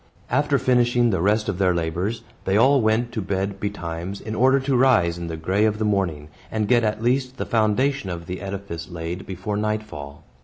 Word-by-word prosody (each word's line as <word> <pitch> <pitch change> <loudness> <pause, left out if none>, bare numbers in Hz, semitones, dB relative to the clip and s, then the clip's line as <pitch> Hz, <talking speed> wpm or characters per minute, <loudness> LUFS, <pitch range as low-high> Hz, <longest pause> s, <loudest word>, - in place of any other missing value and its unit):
After 145 +2 +2
finishing 120 -2 +3
the 95 - 0
rest 105 +3 +2
of 100 -3 -2
their 90 -2 +3
labors, 85 +7 -2 0.2
they 95 +1 +2
all 135 +4 +5
went 110 +2 +1
to 110 - -3
bed 95 +1 -2
betimes, 95 -2 -4
in 110 - -6
order 130 +4 +4
to 135 0 0
rise 90 -10 +3
in 85 - -5
the 80 -1 -4
gray 95 +6 +1
of 110 -1 +2
the 110 - -1
morning, 90 -8 -1 0.2
and 110 -1 -1
get 120 0 +4
at 110 +1 -1
least 130 +1 0
the - - -3
foundation 115 +2 +1
of 85 -1 -5
the 90 +1 -6
edifice 95 -3 -6
laid 85 +1 -5
before 95 +2 -4
nightfall. 105 -10 -4
105 Hz, 200 wpm, -23 LUFS, 90-120 Hz, 0.2 s, all